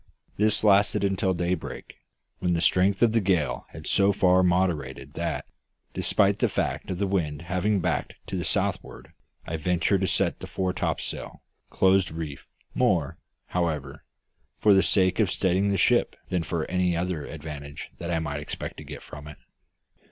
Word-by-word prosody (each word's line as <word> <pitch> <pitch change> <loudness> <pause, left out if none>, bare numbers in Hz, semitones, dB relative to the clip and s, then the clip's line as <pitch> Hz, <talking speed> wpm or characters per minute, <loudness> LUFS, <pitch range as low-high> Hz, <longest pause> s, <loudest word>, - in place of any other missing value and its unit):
This 105 +1 +2
lasted 100 0 +4
until 95 -1 +1
daybreak, 90 0 -3 0.5
when 90 -1 +1
the 85 - +1
strength 95 +4 +3
of 115 - +5
the 115 0 +2
gale 80 -10 0
had - - -10
so 100 0 +4
far 95 -2 +4
moderated 90 -7 0
that - - -3 0.5
despite - - +2
the - - +2
fact - - -2
of 95 - -2
the 100 - 0
wind 85 -6 -1
having 95 +3 0
backed 85 -1 -1
to - - -5
the - - -2
southward - - -2 0.3
I 80 - -3
ventured 90 +4 +1
to 95 - +1
set 85 - +1
the - - -7
fore 95 -1 -2
topsail, - - -4 0.3
close 95 -1 +3
reefed; 80 -3 -6 0.3
more, - - +1 0.3
however, 75 -5 -2 0.5
for 105 - +5
the 95 - +6
sake 95 -1 +2
of 105 -4 +3
steadying 95 +1 +1
the 100 - +1
ship - - +3
than 90 -2 0
for 80 -1 -2
any 90 -2 0
other 85 -3 -2
advantage 75 -2 -8
that 85 - -5
I 80 -4 -1
expected 75 - -6
to - - -8
get - - -8
from 75 +1 -10
it. 75 - -10
90 Hz, 165 wpm, -26 LUFS, 80-95 Hz, 0.5 s, the